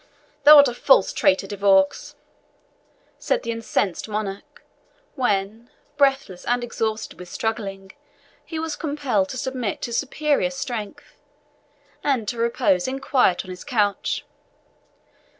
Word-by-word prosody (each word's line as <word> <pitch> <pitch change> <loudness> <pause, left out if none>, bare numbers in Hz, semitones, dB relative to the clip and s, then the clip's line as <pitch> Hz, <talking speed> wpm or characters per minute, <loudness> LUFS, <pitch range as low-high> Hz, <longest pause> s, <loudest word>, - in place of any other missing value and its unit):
"Thou 300 +1 +11
art 285 -1 +8
a 245 - -2
false 245 -4 +3
traitor, 190 +1 +2
De 205 - -6
Vaux," 195 -1 +2 1.0
said - - -1
the 230 - -2
incensed 220 -3 -2
monarch, 205 -2 -5 0.5
when, 220 -2 -1 0.3
breathless 270 -10 +1
and 245 0 0
exhausted 220 -3 -3
with 180 -1 -10
struggling, 195 -4 -4 0.5
he 325 - -7
was 320 -1 -3
compelled 280 - -1
to 260 - -6
submit 250 -5 -3
to 235 - -4
superior 285 +2 0
strength, 270 0 -6 0.8
and 255 -7 0
to 235 +2 -3
repose 235 -5 +1
in 265 +1 -3
quiet 255 -10 +2
on 185 - -8
his 180 - -9
couch. 210 -7 -1
230 Hz, 130 wpm, -23 LUFS, 200-270 Hz, 1.0 s, Thou